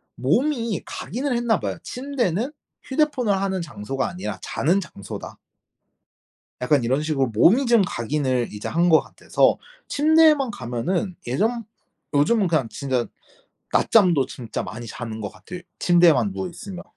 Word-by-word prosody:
몸이 230 - 0
각인을 255 +4 -3
했나 235 -6 +1
봐요. 95 -3 -3
'침대는 250 - -2 0.3
휴대폰을 265 -7 +1
하는 190 -2 -1
장소가 135 -2 -3
아니라 105 - -5
자는 175 +7 +1
장소다.' 100 - -8 1.2
약간 130 0 +2
이런 130 +5 +1
식으로 150 -4 0
몸이 185 - +4
좀 235 -3 +5
각인을 130 -2 -1
이제 105 0 -5
한 170 +2 +2
것 160 -2 +6
같아서 - - +1 0.3
침대에만 305 -3 +4
가면은 170 - -2
예전 225 - 0 0.5
요즘은 185 +8 +3
그냥 150 -9 0
진짜 130 -5 -2 0.7
낮잠도 175 -11 +4
진짜 120 -4 -5
많이 115 +1 -7
자는 110 -1 -6
것 100 - -4
같아요 140 - -10 0.2
침대에만 165 - +4
누워 95 -1 -4
있으면. 185 - -9
170 Hz, 310 characters per minute, -23 LUFS, -, 1.2 s, 것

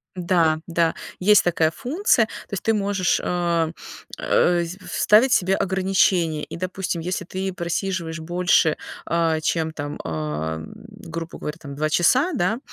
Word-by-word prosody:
Да, 170 -3 +2
да, 165 -1 +1 0.2
есть 205 +3 +5
такая 165 -2 +2
функция, 275 - +1
то 215 - -11
есть 195 - -3
ты 225 - +2
можешь, 200 -3 +1
э, 170 -2 0 0.5
э, 175 -1 +2
в 180 +3 -8
вставить 230 +5 +4
себе 190 +1 +3
ограничения 185 -4 +1
и, - - -7
допустим, 185 -1 -3
если 185 +2 -3
ты 190 +2 -4
просиживаешь 170 -1 -3
больше, 175 -1 +2 0.3
а, 165 -1 +1
чем 160 0 0
там, 145 -1 -6
а, 80 0 -3 0.3
грубо 170 -6 -8
говоря, 150 +1 -5
там, 145 -3 -9
а, - - -9
2 155 +2 -1
часа, 255 - +3
да, 220 -2 0
175 Hz, 150 wpm, -23 LUFS, 160-190 Hz, 0.5 s, есть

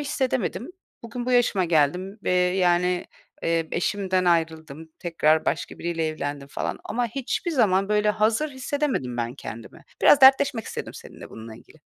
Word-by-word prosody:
hissedemedim. 260 -5 -2 0.4
Bugün 240 +1 -6
bu 255 - 0
yaşıma 220 -6 +3
geldim 175 +5 +1
ve, - - 0
yani, 180 0 +2 0.4
eee, 165 -1 0
eşimden 185 -1 0
ayrıldım, 160 -2 -1
tekrar 160 -3 +1
başka - - -3
biriyle 165 -1 -2
evlendim 145 -2 -5
falan - - -4
ama 240 +2 -1
hiçbir 270 - -3
zaman, 195 - +2
böyle, 210 0 +2
hazır 220 +8 +1
hissedemedim 260 - -2
ben 120 0 -3
kendimi. 115 -4 -10 0.2
Biraz 290 - +7
dertleşmek 265 -3 +5
istedim - - -7
seninle - - -12
bununla 110 0 -10
ilgili. - - -19
185 Hz, 145 wpm, -24 LUFS, 160-240 Hz, 0.4 s, Biraz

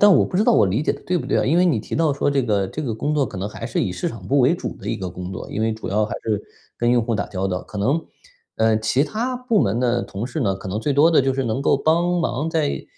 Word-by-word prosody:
但 205 -1 +7
我 - - +5
不 - - -8
知 200 - +4
道 - - +4
我 105 - +5
理 105 +10 0
解 - - +1
的 - - -5
对 180 -1 0
不 - - -6
对 - - +1
啊？ - - +1
因 160 +6 +3
为 180 - +5
你 130 -10 +2
提 - - -6
到 160 -2 +2
说 140 +1 0
这 140 -2 +1
个 100 -4 +1
这 155 - -5
个 115 -6 -2
工 145 +7 -1
作 145 -3 +2
可 105 - -9
能 95 +2 -3
还 115 +2 -6
是 115 - -1
以 90 - -1
市 90 - -2
场 105 -6 -9
部 140 +8 +2
为 135 +6 +4
主 180 - -5
的 - - -7
一 - - -1
个 95 -2 -5
工 90 +2 -7
作。 95 - -7
因 110 - -3
为 110 0 +1
主 110 - -7
要 105 +2 +1
还 - - -5
是 105 -2 -1 0.4
跟 120 0 +2
用 120 -1 +3
户 115 - -1
打 100 - -1
交 95 -1 -3
道， 90 -1 -2
可 - - -10
能 135 +11 +1 0.5
呃， 110 -1 +3
其 125 +6 +1
他 240 - -2
部 240 -4 +1
门 100 +4 +1
的 120 -1 +1
同 100 +5 -5
事 140 +4 -4
呢， 100 -5 +1
可 95 - -10
能 105 +4 -2
最 145 - -1
多 155 +4 +5
的 155 - +5
就 135 0 +1
是 135 -1 -1
能 115 +3 -1
够 140 - +3
帮 170 +5 +2
忙 155 -1 -1
在， 160 -3 -1
120 Hz, 345 characters per minute, -22 LUFS, 105-155 Hz, 0.5 s, 但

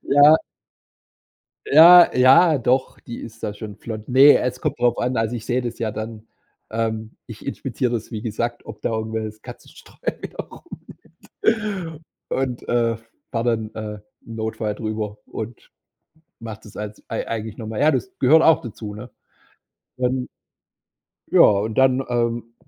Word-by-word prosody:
Ja. 145 +3 +6 1.3
Ja, 170 +4 +9
ja, 135 +6 +6
doch, 125 +2 0
die 120 - -8
ist 115 0 -11
da 105 - -2
schon 105 -1 -9
flott. 110 -1 -8
Ne, 135 +3 +7
es 125 0 -3
kommt - - -2
drauf 120 -1 +2
an. 125 0 -1
Also 115 +2 -1
ich 110 - -8
sehe 125 +1 0
das 120 -1 -5
ja 110 -2 -1
dann, 110 0 -7 0.4
ähm, 110 0 -3
ich 110 -3 -11
inspiziere 130 -2 -2
das, 115 0 -4
wie 110 -2 -5
gesagt, 120 +1 -3
ob 110 - -10
da - - -2
irgendewelches 110 -1 -4
Katzenstreu - - -13 0.3
wieder - - -8 0.9
rumliegt 195 -8 -2 0.3
Und, 130 -2 -3
äh, 115 -1 +1 0.3
fahre 115 -2 -2
dann, 110 0 -8
äh, 105 -1 -6 0.3
im 115 - -8
Notfall 110 -1 -3
drüber 110 -1 -4
und 110 +1 -8 0.7
mach 110 -2 -7
das 105 -2 -16
als 105 0 -7
ei 115 - -4
eigentlich 110 -1 -5
noch 110 - -7
mal. 110 -1 -4
Ja, 155 +2 +4
das 145 +8 -2
gehört 155 +5 +6
auch 160 -2 +5
dazu, 105 -3 -8
ne? 105 - -9 0.9
Dann 125 0 -1 1.0
ja, - - +3
und 105 +2 +4
dann, 130 0 +4
ähm, 120 -1 -2
115 Hz, 155 wpm, -22 LUFS, 110-130 Hz, 1.3 s, Ja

